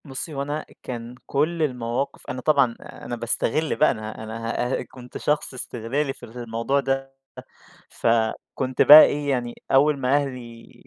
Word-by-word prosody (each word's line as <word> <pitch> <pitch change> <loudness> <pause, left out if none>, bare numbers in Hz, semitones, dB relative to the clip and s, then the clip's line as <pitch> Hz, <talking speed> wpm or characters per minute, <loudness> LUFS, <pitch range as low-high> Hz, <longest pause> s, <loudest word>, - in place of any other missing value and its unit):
بُصّي، 140 +3 -6
هو 140 - -3
أنا 145 +2 -3
أ - - -15 0.2
كان 120 -1 -6
كلّ 155 +4 0
المواقِف 125 -1 -2
أنا 130 -2 -4
طبعًا، 140 -5 +3
أنا 120 - -7
باستغل 120 +6 -1
بقى 155 - +4
أنا، 110 0 -7
أنا 110 +1 -6 0.3
هأ - - -3
كنت 125 -1 -11
شخص 150 -2 -1
إستغلالي 130 +3 -3
في - - -12
الموضوع 115 +3 -2
ده، 135 0 -2 0.7
ف - - -3 0.5
كنت 130 -1 -2
بقي 150 +1 +11
إيه، 145 0 -2
يعني 120 -3 -1 0.2
أول 140 +2 +4
ما 135 0 +1
أهلي 125 -5 -4
130 Hz, 160 wpm, -24 LUFS, 120-145 Hz, 0.7 s, بقي